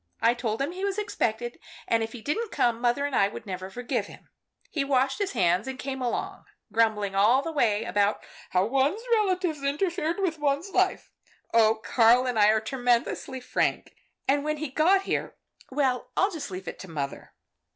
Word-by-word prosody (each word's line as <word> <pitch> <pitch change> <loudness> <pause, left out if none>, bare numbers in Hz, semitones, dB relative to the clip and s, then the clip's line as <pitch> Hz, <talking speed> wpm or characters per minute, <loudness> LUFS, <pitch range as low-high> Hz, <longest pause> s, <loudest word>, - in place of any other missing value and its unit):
I 230 +1 +4
told 240 0 -2
him 290 - -2
he 370 +2 -6
was 400 0 -1
expected, 240 - -2 0.3
and 230 - +2
if 225 0 -3
he 235 -3 -9
didn't 430 +9 -2
come, 235 -1 +1
mother 245 +4 +1
and 285 -2 -2
I 195 - +4 0.2
never 185 -1 -5
would 190 - -15
forgive 245 0 -2
him. - - -15 0.4
He 295 - 0
washed 270 +3 +1
his 400 -1 -1
hands 185 +1 +2
and 265 -1 -4
came 265 0 -5
along, 245 -1 -3 0.3
grumbling 215 -3 +2
all 220 +8 +4
the 330 - -3
way 225 -8 +2
about 205 -2 +1 0.3
how 185 +1 +2
one's 275 - +1
relatives 370 -8 +1
interfered 335 +4 -1
with 340 -5 -1
one's 295 +6 0
life - - +1 0.4
oh, 225 -1 +5
Karl 240 +2 +4
and 245 -3 0
I 205 - +6
are 220 +1 +4
tremendously 245 +2 -1
frank, 250 - -1 0.3
and 280 +2 +3
then - - -6
when 305 0 -1
he 310 -1 -4
got 355 +8 +3
here - - -2 0.3
well, 260 -2 0
I'll 390 +2 +3
just 320 - -5
leave 185 -1 -7
it - - -6
to 190 - -9
mother." 140 -4 -5
255 Hz, 195 wpm, -27 LUFS, 220-305 Hz, 0.4 s, I